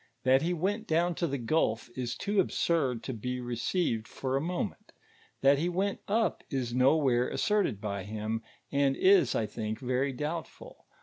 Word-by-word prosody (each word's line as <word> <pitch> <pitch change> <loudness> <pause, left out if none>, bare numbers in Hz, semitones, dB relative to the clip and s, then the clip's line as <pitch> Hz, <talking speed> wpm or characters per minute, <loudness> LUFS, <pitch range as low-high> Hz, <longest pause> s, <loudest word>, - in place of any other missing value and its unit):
That 130 +1 +5
he 170 +3 0
went 200 +6 -1
down 170 +2 +2
to 170 +1 -1
the 140 -2 -2
gul( 115 -2 +1 0.2
is 125 -2 -3
too 205 0 0
absurd 150 -9 +1
to 130 - -4
be 125 +3 -4
received 120 0 -1
for 130 0 -3
a 135 - +1
moment; 175 - -4 0.5
that 140 +1 +5
he 170 +3 0
went 195 +3 -1
up 225 +2 +1
is 125 -4 -2
nowhere 130 -1 +3
asserted 210 - +1
by 100 -2 -4
him, 110 +2 -3 0.3
an4 140 - +4
i», - - +2
I - - -1
think, 110 +1 -4
very 130 +1 0
doubtful. 150 +5 -6
135 Hz, 170 wpm, -30 LUFS, 120-170 Hz, 0.5 s, That